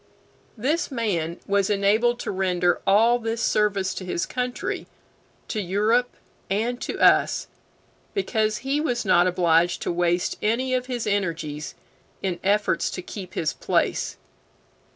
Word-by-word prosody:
This 295 Hz, +10 st, 0 dB
man 185 Hz, -, -2 dB
was 200 Hz, -1 st, +1 dB
enabled 210 Hz, +4 st, +2 dB
to -, -, -3 dB
render 180 Hz, -2 st, +1 dB
all 230 Hz, +5 st, +5 dB
this 225 Hz, 0 st, -3 dB
service 205 Hz, -4 st, +1 dB
to -, -, -6 dB
his 180 Hz, -1 st, -2 dB
country, 250 Hz, -1 st, -3 dB, 0.6 s
to 215 Hz, -, -2 dB
Europe, 215 Hz, +6 st, +2 dB, 0.4 s
and 230 Hz, +5 st, -1 dB
to -, -, -4 dB
us, -, -, +4 dB, 0.7 s
because 220 Hz, -, 0 dB
he 280 Hz, +2 st, +1 dB
was 245 Hz, -7 st, -1 dB
not 180 Hz, -2 st, +5 dB
obliged 175 Hz, -1 st, +2 dB
to -, -, -1 dB
waste 175 Hz, 0 st, 0 dB
any 245 Hz, +5 st, 0 dB
of 255 Hz, 0 st, 0 dB
his 245 Hz, -3 st, -3 dB
energies 165 Hz, -7 st, -2 dB, 0.5 s
in 185 Hz, -3 st, -1 dB
efforts 200 Hz, -3 st, +1 dB
to 180 Hz, -, -6 dB
keep 185 Hz, -1 st, -8 dB
his 155 Hz, -, 0 dB
place. -, -, 0 dB
205 Hz, 135 wpm, -24 LUFS, 180-240 Hz, 0.7 s, all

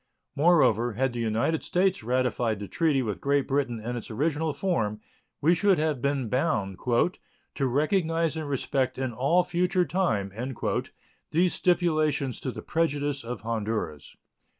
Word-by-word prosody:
Moreover, 140 Hz, -, +4 dB
had 130 Hz, +3 st, 0 dB
the 120 Hz, -, -4 dB
United 115 Hz, +8 st, 0 dB
States 190 Hz, +1 st, +1 dB
ratified 125 Hz, -2 st, 0 dB
the 100 Hz, -, -6 dB
treaty 155 Hz, -6 st, +1 dB
with 105 Hz, -6 st, -4 dB
Great 140 Hz, 0 st, +1 dB
Britain 135 Hz, -4 st, 0 dB
in 120 Hz, +3 st, -4 dB
its 120 Hz, -, -6 dB
original 150 Hz, +6 st, 0 dB
form, 115 Hz, -, -1 dB, 0.4 s
we 165 Hz, +4 st, +5 dB
should 195 Hz, +1 st, +3 dB
have 155 Hz, -4 st, 0 dB
been 140 Hz, -3 st, 0 dB
bound 110 Hz, -, -1 dB
"to 130 Hz, +2 st, -1 dB
recognize 165 Hz, +4 st, +1 dB
and 155 Hz, -2 st, -4 dB
respect 130 Hz, -1 st, -1 dB
in 130 Hz, -2 st, -2 dB
all 140 Hz, +10 st, +3 dB
future 180 Hz, +1 st, +1 dB
time" 110 Hz, -, 0 dB, 1.0 s
these 175 Hz, +3 st, +2 dB
stipulations 155 Hz, -7 st, +1 dB
to 130 Hz, -, -3 dB
the -, -, -8 dB
prejudice 145 Hz, -4 st, -1 dB
of 120 Hz, -1 st, -6 dB
Honduras. 110 Hz, -8 st, -3 dB
140 Hz, 145 wpm, -27 LUFS, 120-165 Hz, 1.0 s, we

